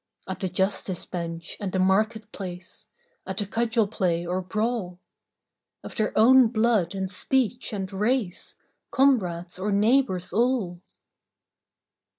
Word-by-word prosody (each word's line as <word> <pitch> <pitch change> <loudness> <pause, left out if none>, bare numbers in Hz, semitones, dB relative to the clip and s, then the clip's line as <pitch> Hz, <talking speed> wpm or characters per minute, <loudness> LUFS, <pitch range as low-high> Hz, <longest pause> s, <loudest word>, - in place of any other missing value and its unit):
At 190 - -5
the 190 - -2
justice 190 0 -1
bench 170 -1 -5
and 200 -3 -3
the 190 - -1
market 215 +3 +1
place, 180 +2 -8 0.4
At 190 0 -4
the 205 - +1
cudgel 225 +1 +1
play 175 -5 -1
or 180 +2 -1
brawl, 210 -2 -2 0.8
Of - - -9
their 215 - 0
own 250 +3 +7
blood 220 -5 +1
and 190 -1 -2
speech 245 +5 0
and 195 -2 -4
race, 210 -1 -1 0.3
Comrades 190 -10 +1
or 205 +2 -1
neighbours 205 -2 +2
all 225 -7 0
200 Hz, 130 wpm, -25 LUFS, 185-230 Hz, 0.8 s, own